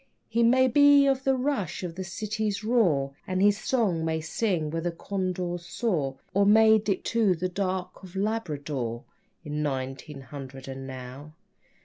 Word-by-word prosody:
He 230 +1 0
may 255 +3 +5
be 285 +2 +6
of 270 -1 +1
the 270 0 +3
rush 255 - -2
of 175 -2 -4
the 190 +2 -5
city's 215 +3 -3
roar 175 - +2
And 185 0 -1
his 205 +1 +4
song 215 -9 0
may 160 0 0
sing 160 -1 -1
where 165 +1 -2
the 175 +1 -1
condors 180 -1 -3
soar, 155 - -1 0.2
Or 200 - +4
may 220 +2 +6
dip 205 -3 -2
to 220 -5 +3
the 180 +2 -2
dark 185 -1 -3
of 185 -1 -12
Labrador, 145 - -2 0.4
In 150 0 -3
nineteen 135 0 -4
hundred 135 0 -9
and 135 0 -7
now. 130 +4 -9
185 Hz, 160 wpm, -27 LUFS, 150-220 Hz, 0.4 s, be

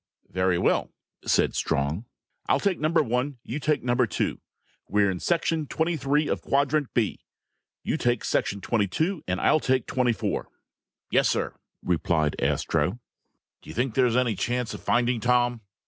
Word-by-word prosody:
"Very 95 -1 +1
well," 90 - +1 0.4
said - - +3
Strong. 70 - -1 0.4
"I'll - - +4
take 200 -3 0
number 155 +2 +3
one, 125 +2 -1
you 130 +6 -4
take 150 0 0
number 120 0 +2
two. - - -2 0.5
We're 100 -1 +3
in 90 - -4
section 165 -3 0
twenty 165 +4 0
three 150 +1 +1
of - - -1
quadrant 140 0 +1
B. 115 -4 +1 0.6
You - - -1
take 120 0 0
section 100 0 0
twenty 105 -2 +1
two 160 - -1
and 90 +1 -1
I'll 155 - +4
take 130 -3 +1
twenty 125 -2 +1
four." 100 - -3 0.6
"Yes, - - +4
sir," - - -1 0.3
replied 80 -3 +1
Astro. 80 +7 0 0.6
"Do - - -14
you - - -8
think 125 0 0
there's 125 -2 +3
any 125 -3 +2
chance 120 +3 -2
of - - -8
finding 120 0 +1
Tom?" 120 0 +2
125 Hz, 165 wpm, -26 LUFS, 100-145 Hz, 0.6 s, I'll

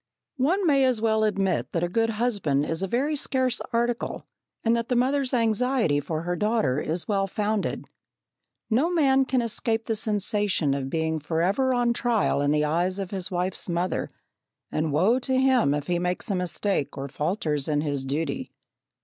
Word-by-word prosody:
One 360 +9 +2
may 280 -4 +4
as 255 -3 +2
well 220 -1 +2
admit 195 -3 0
that 170 - 0
a - - +2
good 225 +5 +1
husband 205 - 0
is 160 +2 -3
a 195 - -1
very 275 +9 0
scarce 260 -3 0
article, 235 0 -1 0.4
and 230 0 +3
that 230 0 -2
the 250 - +1
mother's 260 +2 +1
anxiety 230 - +2
for 155 +2 -4
her 175 +1 -1
daughter 210 - +1
is 160 +3 -3
well 195 -2 +1
founded. 210 +1 -2 0.8
No 255 +9 +2
man 270 -6 +3
can 255 -2 +1
escape 225 0 -1
the 225 - -1
sensation 205 -7 0
of 135 -1 -3
being 160 +1 -1
forever 185 - +1
on 240 -1 +2
trial 235 -11 +1
in 145 - +1
the 150 0 +2
eyes 175 +5 0
of 195 -2 -4
his 190 -3 -1
wife's 180 +1 -2
mother, 175 +2 -1 0.6
and 155 0 -1
woe 190 - +3
to 260 0 0
him 260 - +3
if 145 0 -1
he 175 +1 0
makes 180 +5 -2
a - - +1
mistake 180 -3 -1
or 135 0 -4
falters 150 -1 -2
in 150 -1 +1
his 145 -3 -2
duty! 160 - -3
205 Hz, 180 wpm, -25 LUFS, 160-240 Hz, 0.8 s, may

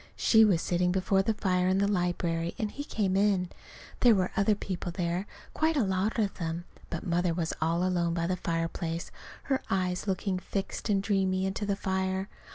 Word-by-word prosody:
She 220 -1 +5
was 190 -6 +3
sitting 180 0 +1
before 190 +1 +2
the 215 +3 0
fire 180 -3 +1
in 185 +1 +3
the 200 +1 +2
library, 175 -3 -1
and 215 -2 -2
he 285 - -5
came 200 -9 -1
in. 195 -3 +2 0.5
There 240 -3 +6
were 185 -1 0
other 200 +2 +3
people 185 -3 -4
there, 175 +2 -2 0.3
quite 315 0 +1
a 265 - +3
lot 190 +3 0
of 210 -3 +1
them; 165 0 -3 0.2
but 170 - -5
Mother 175 -1 +1
was 165 -2 -1
all 165 +2 +1
alone 170 -2 +1
by 170 -1 0
the 185 +2 0
fireplace, 165 -1 -3 0.3
her 270 -1 0
eyes 185 0 -1
looking 190 0 -1
fixed 195 +4 -4
and 195 -2 +2
dreamy 190 -2 +1
into 195 +2 -2
the 200 - +1
fire. 190 0 -1
185 Hz, 190 wpm, -29 LUFS, 175-200 Hz, 0.5 s, There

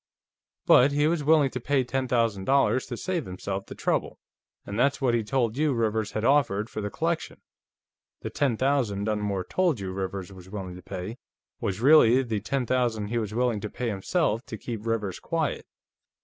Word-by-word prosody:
But 135 +3 +6
he 145 +1 +2
was 160 -1 +1
willing 150 -2 +4
to 125 - -4
pay 135 +2 +1
ten 130 +1 -2
thousand 115 -6 +1
dollars 130 -3 +2
to 120 - -5
save 180 -1 -2
himself 95 +1 -5
the - - -8
trouble, - - -1 0.5
and 100 +2 -4
that's 140 +3 +2
what 130 -3 +2
he 115 -1 +1
told 115 0 0
you 150 -1 +2
Rivers 110 -2 -1
had 110 +1 -1
offered 120 -7 +2
for 110 - -4
the 105 - -3
collection. 165 +6 -2 0.8
The - - -5
ten 135 -6 0
thousand 130 -7 +1
Dunmore 105 -3 -1
told 170 - 0
you 95 -1 -4
Rivers 95 0 -4
was 95 -1 -13
willing 95 -3 -6
to 90 - -10
pay 95 +6 -6 0.4
was 100 +2 -3
really 135 -3 +6
the 115 -4 -2
ten 125 +6 -2
thousand 115 -4 0
he 120 +1 0
was 105 -1 -4
willing 120 -3 +1
to 105 - -5
pay, 120 +2 -3
himself, 115 - 0
to 110 - -6
keep 115 0 -6
Rivers 105 -5 -1
quiet. 160 -5 -2
115 Hz, 190 wpm, -26 LUFS, 105-135 Hz, 0.8 s, But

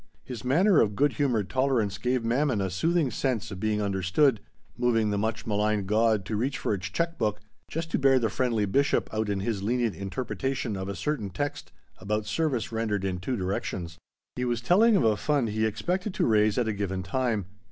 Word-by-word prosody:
His 125 -4 -7
manner 170 +8 +4
of 105 -2 +1
good 145 +5 +2
humored 125 -9 0
tolerance 125 -7 0
gave 125 +1 0
Mammon 125 0 +1
a 95 -2 -1
soothing 160 - +1
sense 115 -5 -1
of 95 - -6
being 105 0 0
understood, 100 - +2 0.4
moving 115 -3 +1
the 100 - 0
much 110 0 -2
maligned 105 -1 0
god 110 0 +2
to 110 - -3
reach 130 +7 -1
for - - -1
its 95 -2 -3
check 170 0 -2
book, 105 -2 0 0.3
just 165 +1 -4
to - - +1
bear 135 -1 +5
the 120 -3 +2
friendly 115 -5 +1
bishop 140 +7 +1
out 110 -1 -1
in 100 -1 -1
his 100 -1 -2
lenient 120 +1 0
interpretation 120 +4 -3
of 95 0 -4
a 100 - -4
certain 150 -10 -2
text 145 +11 -4 0.3
about 105 +2 -2
service 125 0 -1
rendered 110 -3 -1
in 90 -2 -2
two 120 +7 -2
directions. 90 -3 -3 0.4
He 125 - -2
was 120 -2 0
telling 205 - +4
of 195 - +3
a 110 -2 +4
fund 140 0 0
he 110 +1 +1
expected 180 - -2
to - - +1
raise 105 -2 +3
at 120 -2 +1
a 110 - 0
given 95 -2 -3
time. 110 0 -1
110 Hz, 205 wpm, -27 LUFS, 100-130 Hz, 0.4 s, bear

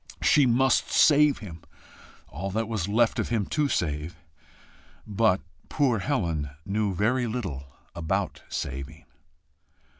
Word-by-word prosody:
She 145 -3 +5
MUST 125 +2 +2
save 150 -2 +5
him 85 -6 -10 0.7
all 95 +6 -5
that 110 +3 -2
was 110 -5 -2
left 115 +3 +2
of - - -1
him 110 -4 0
to 150 -1 +2
save! 75 - -2 0.9
But 105 -2 +2 0.3
poor 130 -7 +1
Helen 85 - -1 0.2
knew 100 -1 -1
very 120 +6 +1
little 95 - -4 0.3
about 80 -2 -2
saving. 70 +4 -6
105 Hz, 120 wpm, -26 LUFS, 85-120 Hz, 0.9 s, She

